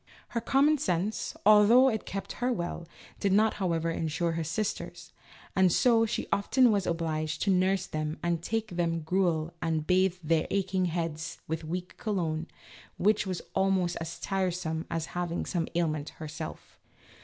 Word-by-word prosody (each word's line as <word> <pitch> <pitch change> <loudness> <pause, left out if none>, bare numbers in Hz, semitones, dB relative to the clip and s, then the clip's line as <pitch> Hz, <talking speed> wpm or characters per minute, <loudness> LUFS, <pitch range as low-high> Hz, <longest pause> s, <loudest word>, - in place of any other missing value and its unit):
Her 235 - -2
common 280 +5 +3
sense, 200 - -1
although 215 +5 +7
it 220 -4 -1
kept 195 0 -5
her 250 +1 +2
well, 170 -5 -3 0.3
did 200 - +1
not 215 +3 +4
however 165 -2 0
insure 165 +1 -1
her 165 0 -2
sisters, 200 +7 -4 0.4
and 190 -2 +5
so 225 +3 +4
she - - -2
often 245 +4 +4
was 200 -3 +1
obliged 155 -2 -1
to 200 - +2
nurse 185 0 +2
them, 155 0 -3
and 170 -1 0
take 225 +4 -2
them 170 -1 -1
gruel, 165 -1 0
and 160 -2 -1
bathe 185 0 +3
their 160 0 +1
aching 190 -1 0
heads 165 -1 -3
with 160 +1 -3
weak 180 +3 -5
cologne, 170 -6 -2 0.5
which 210 +1 +2
was 185 -2 -3
almost 190 -2 +1
as 165 +1 -6
tiresome 180 -4 -2
as 165 -2 -2
having 175 -1 -2
some 170 -3 -1
ailment 155 -3 0
her 155 - -6
self. 150 - -8
175 Hz, 160 wpm, -29 LUFS, 165-200 Hz, 0.5 s, although